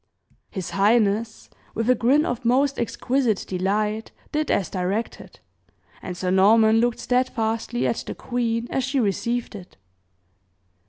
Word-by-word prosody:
His 190 Hz, -5 st, -5 dB
highness, 215 Hz, +1 st, +1 dB, 0.3 s
with 225 Hz, 0 st, -1 dB
a 255 Hz, -, +6 dB
grin 255 Hz, +6 st, +3 dB
of 245 Hz, +1 st, -3 dB
most 265 Hz, +4 st, +2 dB
exquisite 240 Hz, -1 st, 0 dB
delight, 210 Hz, +4 st, -1 dB, 0.2 s
did 305 Hz, 0 st, -1 dB
as 195 Hz, -, +1 dB
directed; 195 Hz, +5 st, -4 dB, 0.6 s
and 180 Hz, -1 st, -6 dB
Sir 180 Hz, 0 st, -1 dB
Norman 220 Hz, +4 st, +5 dB
looked 240 Hz, 0 st, +1 dB
steadfastly 240 Hz, -2 st, -1 dB
at -, -, -1 dB
the -, -, -5 dB
queen 235 Hz, -2 st, -2 dB
as 265 Hz, -, 0 dB
she 265 Hz, +2 st, 0 dB
received 235 Hz, +3 st, -1 dB
it. 190 Hz, -4 st, -11 dB
225 Hz, 130 wpm, -23 LUFS, 205-245 Hz, 0.6 s, a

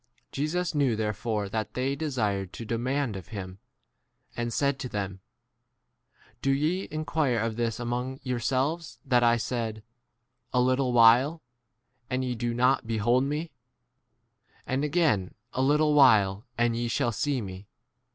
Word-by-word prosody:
Jesus 165 Hz, +5 st, -1 dB
knew 140 Hz, -6 st, +2 dB
therefore 105 Hz, 0 st, -2 dB
that 110 Hz, +2 st, -4 dB
they 130 Hz, +2 st, 0 dB
desired 105 Hz, -, -1 dB
to 115 Hz, -, -7 dB
demand 120 Hz, +1 st, -1 dB
of 95 Hz, -3 st, -8 dB
him, 95 Hz, -3 st, -7 dB, 0.8 s
and 120 Hz, 0 st, -2 dB
said 140 Hz, +1 st, 0 dB
to 130 Hz, -, -4 dB
them, 100 Hz, -3 st, -4 dB, 1.2 s
Do'ye 150 Hz, +7 st, +1 dB
inquire 155 Hz, -5 st, 0 dB
of 115 Hz, 0 st, -1 dB
this 115 Hz, 0 st, -1 dB
among 125 Hz, +2 st, -3 dB
yourselves 135 Hz, +6 st, -1 dB
that 125 Hz, -3 st, +3 dB
I* 120 Hz, 0 st, +4 dB
said, 115 Hz, -2 st, -3 dB, 0.7 s
A 125 Hz, -, +3 dB
little 130 Hz, +1 st, +2 dB
while 120 Hz, +7 st, +5 dB, 0.7 s
and 130 Hz, 0 st, -1 dB
ye 125 Hz, -, -1 dB
do 120 Hz, 0 st, -2 dB
not 125 Hz, 0 st, +2 dB
behold 120 Hz, +4 st, +2 dB
me; 150 Hz, +4 st, -3 dB, 1.1 s
and 130 Hz, +2 st, -1 dB
again 150 Hz, -, +1 dB, 0.2 s
a 130 Hz, -, -1 dB
little 150 Hz, +3 st, +3 dB
[while] 110 Hz, -8 st, +5 dB
and 120 Hz, -1 st, +2 dB
ye 120 Hz, +1 st, -1 dB
20 -, -, -1 dB
shall 120 Hz, 0 st, 0 dB
see 135 Hz, +5 st, -1 dB
me 95 Hz, -2 st, -8 dB
125 Hz, 140 wpm, -27 LUFS, 110-140 Hz, 1.2 s, while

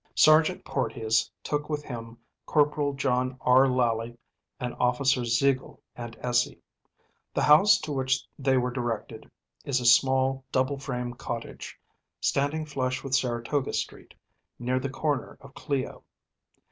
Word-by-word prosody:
Sergeant 155 Hz, +1 st, +5 dB
Porteus 115 Hz, -2 st, 0 dB
took 150 Hz, 0 st, -2 dB
with 150 Hz, -1 st, -2 dB
him 115 Hz, -4 st, -8 dB, 0.3 s
Corporal 150 Hz, -1 st, +2 dB
John 130 Hz, -1 st, 0 dB
R. 130 Hz, +2 st, +5 dB
Lally 120 Hz, -2 st, 0 dB, 0.4 s
and 125 Hz, -1 st, -3 dB
Officers 125 Hz, -1 st, +2 dB
Zeigel 135 Hz, 0 st, 0 dB, 0.2 s
and 120 Hz, -1 st, -8 dB
Essey. 120 Hz, -1 st, +1 dB, 0.8 s
The -, -, +1 dB
house 155 Hz, +8 st, +7 dB
to 155 Hz, -, -5 dB
which 130 Hz, -2 st, 0 dB
they 135 Hz, -1 st, +2 dB
were 125 Hz, 0 st, 0 dB
directed 120 Hz, -3 st, -4 dB, 0.3 s
is 135 Hz, -2 st, 0 dB
a 125 Hz, -, -5 dB
small, 130 Hz, +2 st, +4 dB
double 130 Hz, +2 st, 0 dB
frame 125 Hz, -3 st, -4 dB
cottage, 115 Hz, -1 st, -7 dB, 0.4 s
standing 145 Hz, +3 st, 0 dB
flush 130 Hz, -3 st, -2 dB
with 135 Hz, -2 st, -5 dB
Saratoga 130 Hz, +2 st, 0 dB
Street, -, -, -5 dB, 0.4 s
near 125 Hz, +1 st, -1 dB
the 135 Hz, +1 st, -3 dB
corner 140 Hz, -1 st, -2 dB
of 140 Hz, 0 st, -15 dB
Clio. 140 Hz, -2 st, -3 dB
130 Hz, 135 wpm, -27 LUFS, 125-140 Hz, 0.8 s, house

